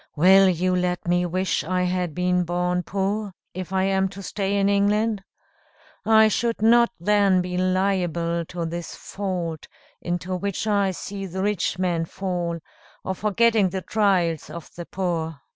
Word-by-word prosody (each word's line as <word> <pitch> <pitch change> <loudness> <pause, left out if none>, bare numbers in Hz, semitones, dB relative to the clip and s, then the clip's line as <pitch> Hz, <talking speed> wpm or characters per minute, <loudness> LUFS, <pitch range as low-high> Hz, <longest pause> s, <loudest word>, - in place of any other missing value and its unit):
Will 190 +4 +6
you 185 +1 +1
let 180 -1 -1
me 175 0 +2
wish 185 +2 -1
I 180 +2 0
had 180 -3 -1
been 180 0 +1
born 180 +1 -1
poor, 200 +2 -2 0.2
if 185 0 -6
I 190 0 +1
am 190 0 +1
to 200 +1 -10
stay 200 +1 -2
in 200 0 +2
England? 205 +1 +1 0.8
I 220 0 +6
should 230 +2 0
not 235 +2 +5
then 200 0 +3
be 180 0 -3
liable 180 -2 0
to 170 0 -5
this 170 +1 -5
fault 180 -5 -4 0.3
into 175 +1 -3
which 200 +2 -3
I 200 -2 +2
see 195 +1 -6
the 190 +2 -4
rich 205 -3 0
men 175 -3 0
fall, 175 -2 -3 0.4
of 190 -1 -3
forgetting 215 -1 +3
the 190 0 -4
trials 180 -8 +1
of 165 +1 -9
the 175 -1 -7
poor." 165 -5 -3
185 Hz, 160 wpm, -24 LUFS, 175-200 Hz, 0.8 s, Will